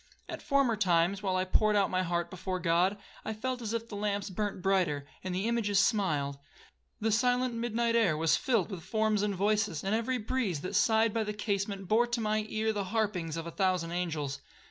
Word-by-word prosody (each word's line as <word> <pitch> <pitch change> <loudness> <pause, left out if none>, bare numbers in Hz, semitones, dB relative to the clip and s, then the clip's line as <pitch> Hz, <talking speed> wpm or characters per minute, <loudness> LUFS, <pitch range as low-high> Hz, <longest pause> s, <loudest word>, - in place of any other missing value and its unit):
At - - -6
former 275 -5 +2
times, 185 -1 +2
while 190 -2 0
I 185 0 +1
poured 210 +3 +2
out 200 -1 +2
my 185 0 +1
heart 170 -1 -1
before 185 0 -3
God, 180 +3 +2 0.3
I 220 - -3
felt 250 +3 -3
as 220 -2 -3
if 230 0 -3
the 215 - -7
lamps 205 -1 -2
burnt 205 +1 -2
brighter, 180 -8 +1 0.2
and 185 -1 -3
the 195 +4 -1
images 225 -4 +1
smiled,—the 180 +3 -2
silent 245 +2 +2
midnight 230 0 0
air 195 -10 +3
was 160 0 +3
filled 225 -7 0
with 185 -3 -5
forms 215 +3 +1
and 205 -1 0
voices, 205 -3 0
and 195 +2 0
every 230 +3 0
breeze 215 - -1
that 185 - -5
sighed 220 -1 +3
by 225 - +1
the 210 0 -3
casement 200 -2 -2
bore 230 +5 +3
to 240 0 -1
my 215 -1 0
ear 220 0 0
the 205 -2 -2
harpings 185 -6 -1
of 165 - -4
a 170 - -5
thousand 185 -3 0
angels. 155 -6 -3
205 Hz, 205 wpm, -30 LUFS, 180-220 Hz, 0.3 s, air